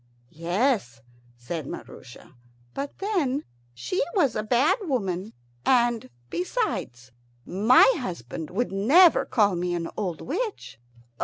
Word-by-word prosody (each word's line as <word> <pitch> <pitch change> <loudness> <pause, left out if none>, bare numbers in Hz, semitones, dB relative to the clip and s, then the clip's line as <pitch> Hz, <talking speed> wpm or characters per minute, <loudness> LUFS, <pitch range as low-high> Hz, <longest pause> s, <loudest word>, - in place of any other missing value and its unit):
"Yes," 175 - 0 0.4
said 140 +5 -5
Maroosia, 125 - -10 0.4
"but 280 0 -5
then 325 -10 -1 0.3
she 365 - -2
was 285 - +2
a - - 0
bad 245 - +2
woman; 210 - -2 0.3
and 240 - +2 0.2
besides, 185 - -3 0.3
my 215 +7 +5
husband 160 - -6
would 230 +5 -2
never 285 - +5
call 205 -4 +2
me 175 0 -1
an 165 -1 -3
old 180 -7 -3
witch." 390 - -4
215 Hz, 110 wpm, -25 LUFS, 175-275 Hz, 0.4 s, my